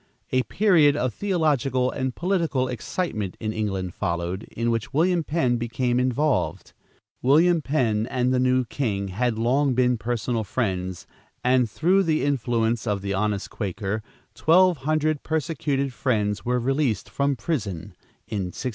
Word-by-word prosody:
A 130 - +3
period 165 -4 +4
of 130 -4 -1
theological 145 -9 +1
and 130 -2 -3
political 165 -8 0
excitement 115 - -3
in 110 -1 -3
England 95 -5 -2
followed, 85 +1 -3
in 115 +1 +1
which 115 +2 -3
William 170 +2 +3
Penn 135 -6 +1
became 120 +1 0
involved. 130 +3 0 0.5
William 160 +6 +4
Penn 120 -7 0
and 125 0 +1
the 130 - +2
new 130 0 +2
king 100 -7 -2
had 115 +4 -1
long 130 +4 +2
been 125 -1 +2
personal 115 0 -1
friends, 95 -5 -2 0.4
and 125 -2 +3
through 180 - +2
the 160 -4 +1
influence 120 -4 0
of 100 -2 -1
the 100 0 -2
honest 105 0 -1
Quaker, 100 +1 -3 0.3
twelve 180 +1 +4
hundred 155 +2 0
persecuted 145 -3 -1
Friends 105 -6 0
were 125 +1 0
released 135 -3 0
from 140 0 0
prison, 105 - -3 0.3
in 105 -4 -2
1686. 110 - -8
125 Hz, 145 wpm, -24 LUFS, 110-145 Hz, 0.5 s, period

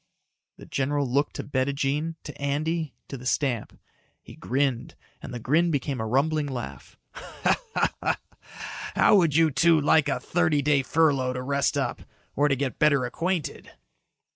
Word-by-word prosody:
The - - -12
general 140 +1 -1
looked 140 +4 0
to - - -4
Bettijean, 140 +3 -1
to 150 - -9
Andy, 155 +3 -1
to 135 - -6
the 125 - -11
stamp. 130 -5 -1 0.4
He - - -12
grinned 130 -1 -1 0.3
and - - -8
the 125 - -5
grin 155 +9 +2
became 140 -4 -1
a 110 - -2
rumbling 145 +5 +1
laugh. 125 -3 -7 2.0
"How - - +5
would 165 -7 +3
you 160 -1 +4
two 160 +4 +4
like 150 0 +3
a 135 - 0
thirty 160 -4 +1
day 145 -1 +3
furlough 135 -3 +2
to 125 0 -4
rest 140 +1 0
up 130 -4 -2 0.3
or 145 +1 +3
to 140 - +2
get 135 -1 -3
better 140 -4 +4
acquainted?" 170 +6 -3
140 Hz, 150 wpm, -26 LUFS, 130-155 Hz, 2.0 s, How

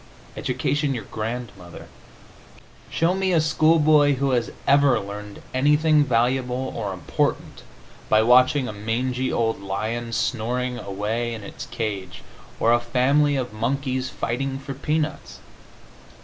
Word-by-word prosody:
Education 145 -2 -1
your 115 - -5
grandmother! 110 -5 -6 1.0
Show 165 +2 +1
me 190 -1 0
a 165 - +4
schoolboy 155 -2 +4
who 135 +1 0
has 120 -2 0 0.2
ever 140 -1 +4
learned 100 +1 -8
anything 150 +3 +4
valuable 125 +1 0
or 105 -4 -3
important 90 -4 -2 0.5
by 110 0 +5
watching 130 +3 +4
a 110 - -5
mangy 125 +5 -2
old 115 -3 0
lion 110 +4 -3
snoring 125 +2 -1
away 110 +4 -3
in 110 - -9
its - - -8
cage 105 -6 -5 0.4
or 115 - +4
a 120 - +4
family 135 +5 +2
of 125 -5 -3
monkeys 130 +3 -2
fighting 135 +3 -3
for 135 0 -7
peanuts. 150 +3 -3
125 Hz, 125 wpm, -23 LUFS, 110-140 Hz, 1.0 s, by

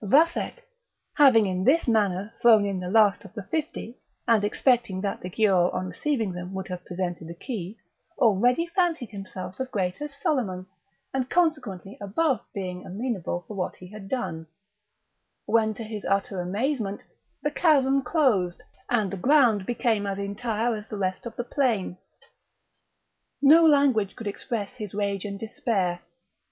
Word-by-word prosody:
Vathek, 305 - +3 0.6
having 260 -7 +6
in 185 -1 -1
this 295 - +3
manner 205 -2 +1
thrown 220 -3 +6
in 195 -2 -2
the 180 0 -4
last 210 -1 +4
of 200 +1 -14
the 210 - -5
fifty, 290 -1 -4 0.3
and 225 -3 +4
expecting 230 -2 +1
that 200 0 -3
the 180 - -5
Giaour 185 -3 +3
on 185 - -2
receiving 230 -4 -1
them 180 +1 -7
would 190 - -4
have 180 0 -5
presented 175 -2 -4
the 170 - -8
key, 205 0 -6 0.4
already 245 - +3
fancied 335 - 0
himself 190 -1 -8
as 260 - -1
great 185 -2 -2
as 295 -1 -5
Soliman, 225 -11 -1 0.5
and 265 -1 -1
consequently 290 - -1
above 240 +6 +1
being 180 -2 -5
amenable 195 -4 -3
for - - -7
what 190 -3 -3
he 180 - -12
had 205 -1 -10
done: 160 -11 -3 1.0
when, 220 -1 +2
to 225 - -6
his 215 -2 -6
utter 195 -1 0
amazement, 205 +3 -2 0.4
the 295 - 0
chasm 275 -5 +3
closed, 245 - +1 0.3
and 215 -6 +1
the 195 - -5
around 245 -10 +4
became 225 -4 0
as 195 -1 -2
entire 220 +3 -1
as 210 0 -8
the 210 - -5
rest 185 +3 -2
of 230 - -9
the 245 - -3
plain. 240 -8 0 1.4
No 305 +4 +7
language 280 -10 +4
could 225 - -8
express 210 +2 -4
his 210 -4 -6
rage 200 -1 -1
and 200 -1 -4
despair. 195 -5 -1
210 Hz, 160 wpm, -26 LUFS, 190-255 Hz, 1.4 s, No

